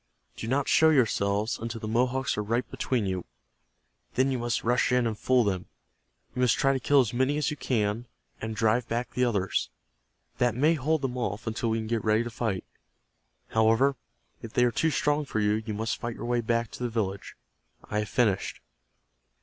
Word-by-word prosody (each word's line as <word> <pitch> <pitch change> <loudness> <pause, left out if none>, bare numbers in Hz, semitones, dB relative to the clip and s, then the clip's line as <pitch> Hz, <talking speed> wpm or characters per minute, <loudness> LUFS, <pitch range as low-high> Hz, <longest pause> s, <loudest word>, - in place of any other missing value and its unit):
Do 110 - -6
not 135 +3 +1
show 160 - +5
yourselves 110 -6 +1
until 115 0 -5
the 110 - -5
Mohawks 125 +4 +1
are 105 - -1
right 115 +3 -1
between 120 -5 -1
you. 95 -2 -2 0.9
Then 130 +2 +3
you 130 - -1
must 120 0 -1
rush 120 +2 +2
in 125 -1 +3
and 115 -1 -1
fool 125 +3 +3
them. 95 -4 -2 0.7
You 125 - -2
must 125 -3 +4
try 135 -1 +3
to 135 - -1
kill 140 +2 +4
as 120 -2 -2
many 130 +4 +1
as 150 +1 0
you 150 - -5
can, 115 -2 -1 0.3
and 110 0 -4
drive 115 +2 +2
back 120 +2 -2
the 125 - 0
others. 100 -6 0 0.7
That 120 -2 +2
may 150 +6 +4
hold 155 0 0
them 125 -1 -2
off 105 -2 -3
until 115 +1 -1
we 110 - +1
can 110 - -3
get 115 -1 -1
ready 110 +1 +3
to 120 - -6
fight. 110 -5 -2 0.9
However, 115 +5 +3 0.5
if 115 - -9
they 125 - +3
are 120 - +2
too 160 - +1
strong 150 0 +1
for 120 -6 -3
you, 105 +1 +2
you 105 - -2
must 110 +2 -2
fight 120 -1 -3
your - - -6
way 120 0 +1
back 115 0 0
to - - -9
the 120 - -1
village. 100 -4 -3 0.5
I 105 - -2
have 105 - -3
finished." 110 -7 +1
115 Hz, 205 wpm, -28 LUFS, 110-125 Hz, 0.9 s, show